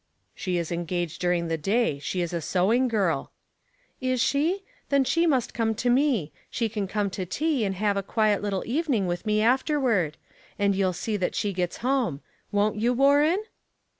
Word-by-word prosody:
" - - -46
She 180 -2 -2
is 170 -1 -3
engaged 175 -1 -3
during 175 -1 +1
the 165 -1 -2
day. 195 -3 +1
She 175 +5 -2
is 175 0 -3
a 170 - -1
sewing 210 - +2
girl." 195 - 0 0.4
" - - -40
Is 255 - 0
she? 320 +11 +1 0.3
Then 280 -1 +4
she 335 +6 +2
must 265 -7 +1
come 225 -1 0
to 245 +3 +1
me. 245 - +2 0.2
She 230 -2 -1
can 205 -2 -3
come 200 0 -1
to 185 - -3
tea, 280 - 0
and 195 -1 -2
have 205 +1 0
a - - +1
quiet 210 +1 +1
little 200 -2 -2
even 290 +3 0
ing 200 -3 +1
with 175 +4 -3
me 215 0 +2
afterward; 245 - +2 0.4
and 200 -1 +2
you'll 190 -1 +1
see 210 +5 -2
that 185 - -1
slie 205 -1 -1
gets 180 -1 -2
home. 250 - +1 0.3
Won't 205 +1 +1
you, 235 +3 +2
Warren?" 290 - +4
210 Hz, 195 wpm, -26 LUFS, 180-255 Hz, 0.4 s, Then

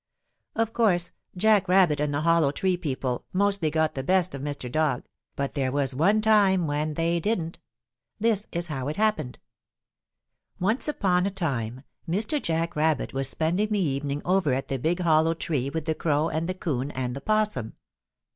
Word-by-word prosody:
Of 225 0 0
course 180 -7 +2 0.3
Jack 210 0 +4
Rabbit 180 -5 +4
and 150 0 0
the 145 +1 -1
Hollow 165 -2 +3
Tree 185 +5 0
people 135 -7 -3
mostly 200 -3 +2
got 160 0 +1
the 135 - -3
best 180 +3 +1
of 140 - -6
Mr. 145 -3 -4
Dog, 145 0 0 0.3
but 140 -1 -2
there 135 -3 -1
was 140 -1 0
one 195 +11 +3
time 200 -5 +4
when 150 +1 -1
they 170 +1 +1
didn't. 170 -4 -2 0.6
This 215 -2 +1
is 170 0 -2
how 135 -5 -4
it 150 - -2
happened. 215 -12 0 1.2
Once 215 +11 0
upon 190 -10 +1
a - - +1
time 130 - -3 0.3
Mr. 215 - 0
Jack 165 +1 -1
Rabbit 155 -1 0
was 135 0 0
spending 175 +9 0
the 210 - +1
evening 145 -4 -1
over 180 -6 +2
at 135 - -4
the 135 - -2
big 170 +7 0
Hollow 165 -1 +3
Tree 140 -5 -2
with 160 +1 -4
the 160 - +1
Crow 155 0 0
and 160 +2 -2
the 185 - -2
'Coon 140 -7 -2
and 125 -3 -3
the 140 - -6
'Possum. 210 - 0
160 Hz, 180 wpm, -26 LUFS, 140-190 Hz, 1.2 s, Jack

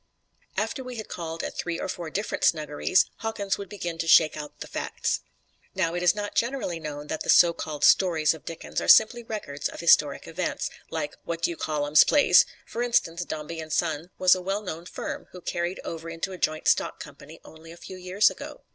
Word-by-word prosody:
After 265 - -2
we 250 -1 -7
had 215 -2 -7
called 165 -1 -5
at - - -5
three 170 -1 -3
or - - -3
four 175 -3 -5
different 205 +6 -3
snuggeries, 155 +3 +2
Hawkins 205 -3 -2
would 200 -2 -7
begin 175 -5 -5
to 165 - -2
shake 160 -1 +6
out 150 -1 -8
the - - -6
facts. - - -2 0.6
Now, 165 0 0
it 175 - -2
is 180 +1 +4
not 205 0 -4
generally 235 -8 -1
known 150 -2 -6
that 155 +1 -4
the - - -5
so 170 -1 +7
called 150 -3 -6
stories 165 -5 +4
of 160 - -12
Dickens 165 - -5
are - - -4
simply 240 +2 +6
records 210 -11 -4
of - - -10
historic 150 -4 +3
events, - - -3 0.2
like 155 -2 -3
What 170 0 -5
do - - +2
you - - -5
call 150 -2 -2
um's 150 +1 +7
plays! 290 - +5 0.2
F'r 235 - -3
instance, 175 -8 +1
Dombey 155 +1 -6
and 160 -1 -7
Son 160 +1 -1
was 185 0 +6
a 185 - -1
well 195 +3 -2
known 170 -2 -6
firm, - - -6
who 180 - -9
carried 175 +1 -3
over 165 0 -6
into 165 +3 -4
a 185 - -7
joint 155 0 -1
stock - - +2
company - - -11
only 160 +1 -13
a 170 - -12
few 185 - -10
years 185 +3 +2
ago. - - -10
170 Hz, 215 wpm, -26 LUFS, 160-190 Hz, 0.6 s, so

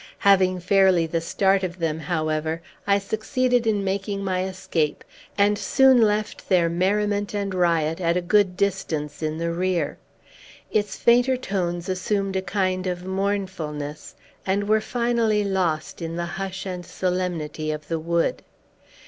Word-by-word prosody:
Having 185 -2 +4
fairly 190 -2 +4
the 165 +1 -2
start 195 +3 +2
of 185 -1 -4
them, 160 -2 -1
however, 155 0 -2 0.2
I 200 0 +4
succeeded 235 +4 0
in 205 -2 +1
making 195 +1 -2
my 185 -1 0
escape, 185 -5 -2 0.3
and 205 0 +3
soon 265 -2 +5
left 210 -1 0
their 175 -3 +4
merriment 205 +4 0
and 200 -1 -2
riot 170 -2 +1
at 170 0 +2
a - - 0
good 185 0 +2
distance 170 -7 -2
in 155 0 -2
the 170 0 -1
rear. 175 -3 -1 0.7
Its 205 -2 0
fainter 245 +2 +4
tones 175 -7 -2
assumed 195 +1 -1
a 190 - +1
kind 185 0 -1
of 180 0 -3
mournfulness, 190 -7 -3 0.3
and 200 +2 0
were 215 0 +3
finally 235 -3 +1
lost 185 -5 -1
in 165 0 -4
the 170 0 -2
hush 195 +2 -5
and 180 -2 -5
solemnity 175 -5 -2
of 150 -1 -4
the 165 0 -2
wood. 170 +1 0
185 Hz, 150 wpm, -24 LUFS, 170-200 Hz, 0.7 s, soon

